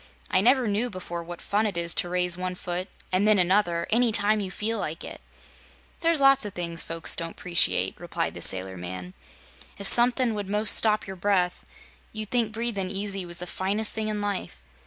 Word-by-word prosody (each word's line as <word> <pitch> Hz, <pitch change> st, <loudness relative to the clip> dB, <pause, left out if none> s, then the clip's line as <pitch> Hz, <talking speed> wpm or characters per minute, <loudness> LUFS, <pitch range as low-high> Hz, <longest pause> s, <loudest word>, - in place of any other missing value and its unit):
"I 185 Hz, -, +3 dB
never 250 Hz, +2 st, +3 dB
knew 215 Hz, +4 st, -1 dB
before 175 Hz, -3 st, -6 dB
what 175 Hz, 0 st, -9 dB
fun 210 Hz, +2 st, 0 dB
it 195 Hz, -4 st, -4 dB
is 170 Hz, 0 st, +1 dB
to 175 Hz, -, 0 dB
raise 180 Hz, -1 st, +5 dB
one 180 Hz, 0 st, -4 dB
foot, 180 Hz, +1 st, -4 dB, 0.2 s
an' 185 Hz, +2 st, +1 dB
then 215 Hz, -1 st, +4 dB
another, 180 Hz, -2 st, +1 dB
any 235 Hz, +1 st, +3 dB
time 210 Hz, +1 st, +4 dB
you 195 Hz, -2 st, -4 dB
feel 220 Hz, +3 st, -3 dB
like 165 Hz, -2 st, -5 dB
it." -, -, -9 dB, 0.8 s
"There's 330 Hz, -2 st, +2 dB
lots 275 Hz, -1 st, +5 dB
o' 210 Hz, -, -4 dB
things 170 Hz, -3 st, -3 dB
folks 165 Hz, 0 st, 0 dB
don't 165 Hz, 0 st, -5 dB
'preciate," 175 Hz, -2 st, +1 dB
replied -, -, -3 dB
the -, -, -8 dB
sailor 95 Hz, 0 st, +3 dB
man. 90 Hz, +1 st, -7 dB, 0.6 s
"If 200 Hz, -, -6 dB
somethin' 245 Hz, +1 st, +4 dB
would 205 Hz, -2 st, -5 dB
'most 210 Hz, +1 st, +2 dB
stop 215 Hz, -1 st, +2 dB
your 190 Hz, -1 st, -8 dB
breath, 180 Hz, -1 st, 0 dB, 0.5 s
you'd 215 Hz, -1 st, -6 dB
think 235 Hz, -3 st, +1 dB
breathin' 220 Hz, -4 st, -2 dB
easy 195 Hz, -1 st, -3 dB
was 170 Hz, 0 st, -3 dB
the 180 Hz, -, -6 dB
finest 200 Hz, +4 st, -1 dB
thing 220 Hz, -1 st, -2 dB
in 210 Hz, -1 st, -2 dB
life. 195 Hz, -, -4 dB
195 Hz, 200 wpm, -26 LUFS, 175-215 Hz, 0.8 s, raise